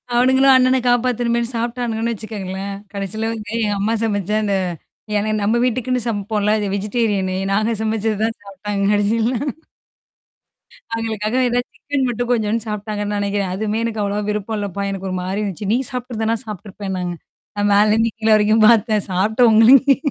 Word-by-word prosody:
அவனுங்களும் 260 +2 +5
அண்ணன 255 0 +4
காப்பாத்தணுமேன்னு 240 -1 +1
சாப்ட்டானுன்னு 235 -1 -2
வச்சுக்கோங்களேன். 200 -2 -5 0.2
கடைசில 205 +3 -3
வந்து 215 -2 -7
எங்க 210 - +1
அம்மா 210 +3 0
சமைச்சா 210 -1 0
அந்த 200 -1 +1 0.6
ஏன்னா 210 +1 -1
நம்ம 215 +3 +2
வீட்டுக்குன்னு 250 +1 0
சமைப்போம்ல, 210 -1 0
அது 210 - -2
வெஜிடேரியனு 200 -2 0 0.2
நாங்க 215 +3 +1
சமைச்சது 220 -1 -1
தான் 225 0 0
சாப்பி்டாங்க 200 0 -4
கடைசில. 220 +4 +1 1.6
அவுங்களுக்காக 225 0 -2
ஏதா 245 +1 +1
சிக்கன் 285 -2 -2
மட்டும் 245 +1 -2
கொஞ்சோன்னு 225 -1 0
சாப்பட்டாங்கன்னு 210 0 -3
நினைக்கிறேன். 200 -2 -1
"அதுவுமே 215 +2 -1
எனக்கு 220 -2 -2
அவ்வளவா 205 +1 -2
விருப்பம் 210 +1 -3
இல்லப்பா! 200 -1 -3
எனக்கு 195 -1 -4
ஒருமாரி 185 +2 -2
இருந்துச்சு. 200 0 -3
நீ - - +3
சாப்ட்டுருந்தனா 230 -3 -2
சாப்ட்டுருப்பேனாங்க." 195 -3 -5 0.5
நான் 205 0 +2
மேலருந்து 215 +2 +3
கீழ 220 0 -1
வரைக்கும் 215 +1 +4
பார்த்தேன். 220 -3 +3
சாப்ட்ட 220 +6 +3
உங்களுக்கே 255 +5 +6
215 Hz, 140 wpm, -19 LUFS, 205-230 Hz, 1.6 s, உங்களுக்கே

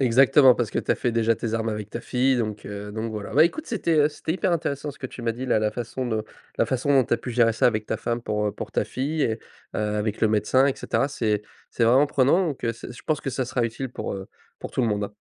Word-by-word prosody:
Exactement, 130 +1 +6
parce 115 -3 -2
que - - -2
tu - - +1
as - - 0
fait 120 - -1
déjà 115 0 +2
tes 115 0 -3
armes 115 0 -1
avec 105 -1 -5
ta 120 - -5
fille 130 +1 +1
donc, 110 -3 -3
heu, 105 0 -6
donc 110 +1 -3
voilà. 105 -2 -6
Bah, 155 +3 +7
écoute 310 - -2
c'était, 170 -7 0
heu, 145 0 +5
c'était 160 +1 -4
hyper 185 0 0
intéressant 150 -3 -2
ce - - -19
que 130 - -5
tu 120 - -9
m'as 115 -1 0
dit 125 +3 -6
là 120 -4 +2
la 105 0 0
façon 120 +2 -4
dont 110 -2 -1 0.3
la - - +2
façon 130 +2 -1
dont 135 -2 +5
tu 120 - +1
as - - 0
pu 125 - -7
gérer 115 -1 +4
ça 110 - +3
avec 110 -3 +1
ta 110 - -1
femme 115 +1 -3
pour, 105 -1 -1
heu, 105 - -1
pour - - -7
ta - - 0
fille 145 +4 -2
et, 110 - +2
heu, 115 - -14 0.4
avec 105 0 -1
le 110 - +4
médecin, 110 +5 +3
et 140 - +1
cetera. 140 - 0
C'est 105 -6 -1 0.3
c'est 115 - -2
vraiment 130 +5 +5
prenant 145 +7 +3
donc, 140 - -5
heu, 115 - +1
c'est 120 - -9
je - - -12
pense 155 -2 0
que 135 - -3
ça 130 +1 -1
sera 125 -1 -1
utile 115 +3 -3
pour, - - -4
heu, 95 0 -7 0.3
pour - - -6
tout 130 - 0
le - - +2
monde. 105 -1 -1
120 Hz, 290 wpm, -25 LUFS, 110-135 Hz, 0.4 s, Bah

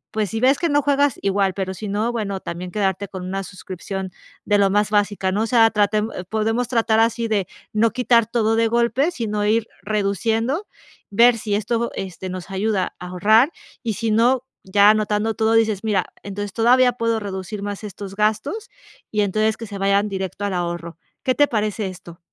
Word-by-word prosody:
pues, 215 -2 0
si 225 - -2
ves 265 +2 +4
que 340 - 0
no 290 0 +3
juegas 285 -2 +2
igual, 195 -1 +1
pero 190 -1 -3
si 210 +3 -7
no, 215 +4 0
bueno, 205 -5 -3
también 180 0 -6
quedarte 200 -1 -1
con 185 -2 -7
una 195 +1 -3
suscripción 190 0 -6 0.3
de 205 - +3
lo 200 -1 +4
más 210 +1 +1
básica, 205 -2 +1
¿no? 200 +3 0
O - - -1
sea, 225 -1 +5
tratemos, 210 +1 +1 0.2
podemos 225 +3 0
tratar 225 -2 +2
así 230 0 +1
de 205 -5 0 0.3
no 220 +2 +3
quitar 235 -1 +3
todo 225 -1 +1
de 225 0 +3
golpe, 235 +6 +2
sino 210 -8 -2
ir 220 +1 +2 0.2
reduciendo, 220 - 0 0.4
ver 235 +3 +5
si 210 -1 -1
esto, 230 +3 -1
este, 185 0 -6
nos 185 +1 -7
ayuda 195 0 -1
a 180 - -7
ahorrar 215 - +4 0.3
y, 225 -3 -1
si 225 +2 -1
no, 240 +4 +3 0.2
ya 200 +2 +5
anotando 215 +1 0
todo, 220 +1 +2
dices: 220 -3 +2
"Mira, 205 -4 +1 0.2
entonces 200 0 -5
todavía 245 +2 +4
puedo 230 -1 0
reducir 200 0 -5
más 205 +1 -5
estos 200 -1 -8
gastos" 220 - -1 0.4
y 210 - +1
entonces 215 +2 +1
que 230 - -7
se 200 -1 -7
vayan 200 +1 +2
directo 190 0 -4
al 200 - -2
ahorro. 170 -1 -3 0.3
¿Qué 255 - +2
te 290 - +4
parece 215 -3 -1
esto? 175 -2 -10
210 Hz, 190 wpm, -21 LUFS, 195-230 Hz, 0.4 s, sea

